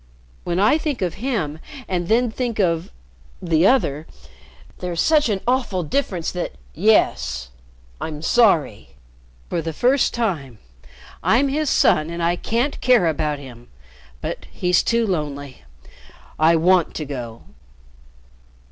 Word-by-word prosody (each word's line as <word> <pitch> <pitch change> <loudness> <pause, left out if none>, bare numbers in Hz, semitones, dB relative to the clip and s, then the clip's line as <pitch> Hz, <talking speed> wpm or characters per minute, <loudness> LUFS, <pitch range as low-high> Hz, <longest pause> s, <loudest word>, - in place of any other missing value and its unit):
When 175 +1 -1
I 220 +10 +4
think 290 -10 -2
of 175 -3 -1
him 185 - -2 0.3
and 175 -2 -2
then 235 +2 +2
think 240 -1 -3
of 170 -5 0 0.5
the 165 +2 +2
other 155 - +1 0.7
there's 175 -2 -4
such 300 - +3
an 200 -3 -1
awful 245 -8 0
difference 175 - -2
that 180 - -4 0.2
yes 65 - +1 0.5
I'm 155 -1 -5
sorry. 165 - +2 0.5
For 170 - -2
the 165 0 -4
first 255 - +2
time. 160 - -2 0.6
I'm 275 +5 +3
his 300 +1 0
son 155 +1 +3
and 170 0 -4
I 170 +1 +2
can't 235 +9 -2
care 245 -7 +4
about 155 -2 0
him; 125 -4 -12 0.5
but - - -5
he's 180 -1 +2
too 235 0 +1
lonely 145 - -4 0.8
I 160 +2 +5
want 175 +1 +3
to 155 - -4
go." 120 -5 -7
175 Hz, 130 wpm, -21 LUFS, 155-230 Hz, 0.8 s, I